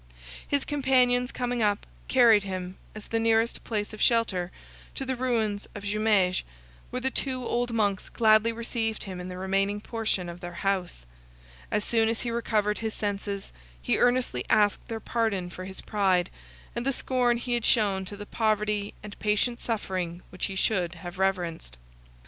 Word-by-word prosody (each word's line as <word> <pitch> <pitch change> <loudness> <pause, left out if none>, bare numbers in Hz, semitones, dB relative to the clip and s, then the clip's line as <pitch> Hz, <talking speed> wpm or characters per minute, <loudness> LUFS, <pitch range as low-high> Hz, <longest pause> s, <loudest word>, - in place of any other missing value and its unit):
His 285 -1 +1
companions 255 -3 +3
coming 245 -1 -1
up, 205 -1 +1 0.2
carried 235 -5 +6
him, 185 -2 -5 0.2
as 215 - -8
the 225 - 0
nearest 225 0 +2
place 210 -2 -2
of 215 - -8
shelter, 195 -7 +2 0.4
to 270 - -3
the 260 0 -1
ruins 225 -5 0
of 205 - -7
Jumieges, 205 -3 +2 0.5
where 250 - -2
the 265 +1 0
two 255 -2 -2
old 240 +1 0
monks 205 -4 0
gladly 220 0 +4
received 225 -1 -2
him 185 -2 -6
in 180 - -6
the 180 0 -6
remaining 195 +2 0
portion 220 -5 -1
of 170 0 -7
their 175 -1 -7
house. 185 - -1 0.6
As 210 - 0
soon 225 -1 +3
as 225 - -1
he 240 - -2
recovered 215 -3 0
his 220 -1 -3
senses, 200 -1 -3 0.3
he - - 0
earnestly 245 - +2
asked 210 -1 +3
their 225 -2 -4
pardon 215 -6 -1
for 185 +1 -7
his 190 0 -7
pride, 190 -4 +1 0.4
and 235 - -1
the 275 - +2
scorn 245 -2 +1
he 245 +1 -3
had 240 -1 0
shown 205 -5 +3
to 205 +2 -7
the 205 - -7
poverty 210 -2 0
and 210 -1 -9
patient 215 +3 +1
suffering 185 -6 -3
which 185 - -2
he 195 - -4
should 185 -3 +1
have 175 +2 -8
reverenced. 175 - -1
210 Hz, 170 wpm, -28 LUFS, 190-235 Hz, 0.6 s, carried